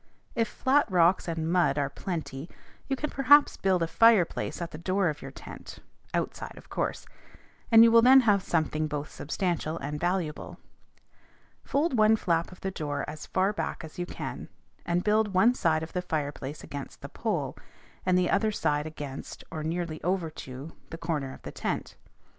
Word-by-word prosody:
If 230 -1 +1
flat 270 +4 +2
rocks 180 0 +3
and 165 -1 -2
mud 175 -5 +3
are 140 -1 +1
plenty, 155 -1 -5 0.4
you 270 - 0
can 295 +3 -3
perhaps 285 +2 +5
build 185 -3 +1
a - - 0
fireplace 215 0 +3
at 170 -1 -4
the 150 - -8
door 185 +1 +1
of 150 - -5
your - - -7
tent - - -10 0.3
(outside, - - -3
of - - -14
course), - - -2 0.7
and 225 0 +9
you 230 - +6
will 230 0 +7
then 260 +3 +8
have 205 -5 +3
something 155 -3 0
both 150 -1 -4
substantial 165 0 -2
and 150 +1 -4
valuable. 175 -3 -2 1.1
Fold 295 +1 0
one 215 +1 +6
flap 170 -5 0
of 180 - -14
the 190 - -2
door 150 -5 -3
as 150 0 -7
far 190 +2 +1
back 205 - -4
as 160 +2 -10
you 175 - -2
can, - - -6 0.4
and 175 +1 +1
build 210 -2 +2
one 215 +7 +5
side 160 -8 +1
of 160 - -8
the 180 - -1
fireplace 145 -4 -4
against 140 -1 -8
the - - -6
pole, - - -2 0.5
and 185 -1 +3
the 180 -1 +2
other 215 +2 +2
side 150 -6 0
against, 145 -3 -7
or 160 -2 -4
nearly 165 0 -3
over 180 -2 0
to, 135 +1 -9 0.2
the 165 - -7
corner 155 -5 -2
of - - -13
the - - -7
tent. - - -3
175 Hz, 180 wpm, -28 LUFS, 155-200 Hz, 1.1 s, and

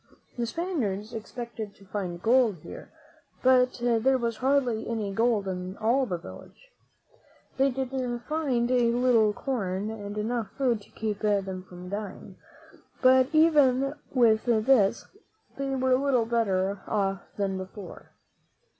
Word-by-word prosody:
The 240 -1 -2
Spaniards 235 - -3
expected 225 -1 -7
to 195 - -18
find 185 -3 -4
gold 235 -3 +4
here, - - -10 0.5
but 255 -1 +5
there 245 +2 +3
was 235 -2 -2
hardly 255 -4 +1
any 215 -4 -2
gold 225 -2 +1
in 185 0 -5
all 245 +4 +2
the 180 - -2
village. - - -13 0.9
They 270 +1 +4
did 265 0 -3 0.4
find 265 -6 0
a 240 -2 +3
little 240 -3 +3
corn 205 -4 -3
and 205 -1 -7
enough 225 +1 -2
food 245 -6 +1
to - - -18
keep 215 -2 -4
them 195 -3 -1
from 180 0 -10
dying; 200 0 -7 0.7
but 255 0 +6
even 290 -4 +4 0.2
with 230 -4 +3
this 230 -2 +3 0.5
they 275 0 -2
were 260 0 +2
little 255 -3 +2
better 200 -4 0
off 195 -2 0 0.2
than 195 -2 -1
before. 190 0 -10
230 Hz, 135 wpm, -27 LUFS, 200-255 Hz, 0.9 s, but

